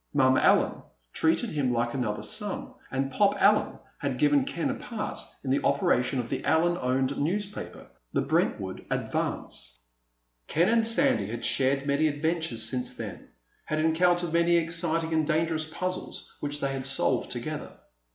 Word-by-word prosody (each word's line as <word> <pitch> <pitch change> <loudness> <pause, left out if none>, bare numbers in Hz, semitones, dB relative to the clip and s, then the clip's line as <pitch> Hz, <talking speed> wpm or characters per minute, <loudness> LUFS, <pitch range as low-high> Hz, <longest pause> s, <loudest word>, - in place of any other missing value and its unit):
Mom 130 -2 +5
Allen - - +3 0.3
treated 165 +8 +2
him 140 -4 0
like 120 0 0
another 115 -6 -2
son, 210 -2 0 0.2
and 135 +1 -1
Pop 205 +6 +2
Allen - - +3 0.2
had - - -2
given 290 -2 +3
Ken 280 0 -1
a - - -1
part 230 -5 -5 0.2
in 130 - -1
the 140 - +1
operation 135 -2 +2
of 120 -2 -2
the - - -3
Allen 170 +2 +3
owned 130 +2 +1
newspaper, 200 +7 -3 0.3
the - - +1
Brentwood - - -1
Advance. - - -3 0.7
Ken 170 +5 +2
and 225 -1 +3
Sandy 110 - +2
had 115 +2 -4
shared 135 +1 +1
many 145 +2 +2
adventures 155 -6 -1
since 125 +1 -3
then; - - -7 0.4
had 155 - -2
encountered 170 +2 +2
many 170 0 +4
exciting 165 -1 0
and 160 -1 +2
dangerous 160 0 0
puzzles 185 +3 -5
which 145 0 -3
they 135 0 0
had 135 0 -4
solved 135 - 0
together. - - -4
155 Hz, 155 wpm, -28 LUFS, 135-175 Hz, 0.7 s, Mom